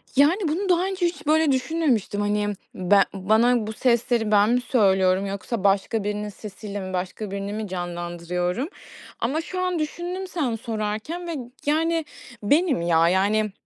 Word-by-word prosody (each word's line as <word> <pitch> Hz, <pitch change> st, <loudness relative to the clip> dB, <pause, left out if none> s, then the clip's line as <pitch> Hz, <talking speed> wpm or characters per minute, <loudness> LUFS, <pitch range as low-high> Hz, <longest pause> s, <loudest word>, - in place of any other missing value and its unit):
Yani, 325 Hz, +8 st, +4 dB
bunu 365 Hz, +6 st, -1 dB
daha 355 Hz, 0 st, +3 dB
önce 380 Hz, -2 st, -1 dB
hiç 310 Hz, -3 st, -3 dB
böyle 315 Hz, -1 st, +4 dB
düşünmemiştim. 260 Hz, -, 0 dB
Hani, 205 Hz, 0 st, 0 dB, 0.2 s
ben 195 Hz, +2 st, +4 dB
bana 220 Hz, +4 st, +2 dB
bu 220 Hz, -, -4 dB
sesleri 235 Hz, -2 st, +1 dB
ben 205 Hz, +1 st, +5 dB
mi 250 Hz, +1 st, +2 dB
söylüyorum, 190 Hz, -5 st, +3 dB
yoksa 200 Hz, +2 st, -4 dB
başka 200 Hz, +2 st, +2 dB
birinin 210 Hz, 0 st, -2 dB
sesiyle 205 Hz, 0 st, -7 dB
mi, 185 Hz, -1 st, -6 dB
başka 190 Hz, +3 st, -4 dB
birini 200 Hz, +1 st, -4 dB
mi 215 Hz, 0 st, -4 dB
canlandırıyorum? 175 Hz, -, -3 dB, 0.5 s
Ama 275 Hz, +8 st, 0 dB
şu 365 Hz, +2 st, -5 dB
an 365 Hz, -2 st, 0 dB
düşündüm 350 Hz, +5 st, -4 dB
sen 285 Hz, -11 st, -1 dB
sorarken 225 Hz, +10 st, -4 dB
ve, 335 Hz, -, -3 dB, 0.3 s
yani, 325 Hz, +1 st, +1 dB, 0.4 s
benim 290 Hz, -, +3 dB
ya. 165 Hz, -1 st, +3 dB
Yani, 205 Hz, +3 st, +2 dB
220 Hz, 155 wpm, -24 LUFS, 200-310 Hz, 0.5 s, ben